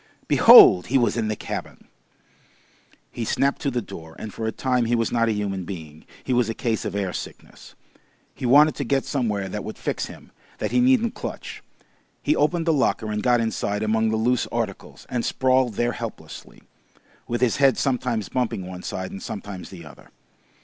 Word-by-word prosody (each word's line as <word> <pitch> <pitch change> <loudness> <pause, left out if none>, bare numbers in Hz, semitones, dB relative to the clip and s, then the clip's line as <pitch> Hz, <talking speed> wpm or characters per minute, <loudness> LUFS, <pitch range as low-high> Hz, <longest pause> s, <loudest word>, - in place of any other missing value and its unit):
Behold! 90 - +8
He 135 - +2
was 120 -5 +1
in 115 -2 -1
the 110 - -1
cabin! - - -7 1.2
He 120 - -5
snapped 140 +5 0
to 140 - 0
the 120 -3 -2
door, 80 -4 -11
and 110 - -8
for 110 - -4
a - - 0
time 125 -1 0
he 120 +1 +1
was 115 -1 0
not 115 -1 +2
a - - +2
human 100 -3 -2
being, 80 -4 -9 0.2
he 130 - -1
was 120 -2 +2
a 115 - -3
case 115 -3 -2
of - - -4
air 95 -3 -2
sickness. - - -9 0.6
He 125 - -4
wanted 150 +5 +6
to 140 - -2
get 135 +2 0
somewhere 105 -8 -1
that 95 - -5
would - - -7
fix - - -3
him, - - -13 0.3
that - - -3
he - - +2
needn't 250 -2 +3
clutch. - - -7 0.6
He 300 - +1
opened 165 +2 +1
the 165 - +3
locker 120 -6 0
and 105 0 -2
got 120 0 +3
inside 105 -2 -2
among 110 +1 +1
the 110 - 0
loose 120 +2 +1
articles, 115 -5 -5
and 120 -2 -2
sprawled 130 -3 +1
there 120 +2 0
helplessly, 115 -2 -9 0.6
with 120 +1 -2
his 125 -3 +2
head 135 -2 +4
sometimes 125 -5 -1
bumping 120 -7 -2
one 90 0 -8
side 95 0 -5
and 95 - -8
sometimes 100 -5 -7
the 85 -4 -11
other. 75 - -15
115 Hz, 195 wpm, -23 LUFS, 105-130 Hz, 1.2 s, Behold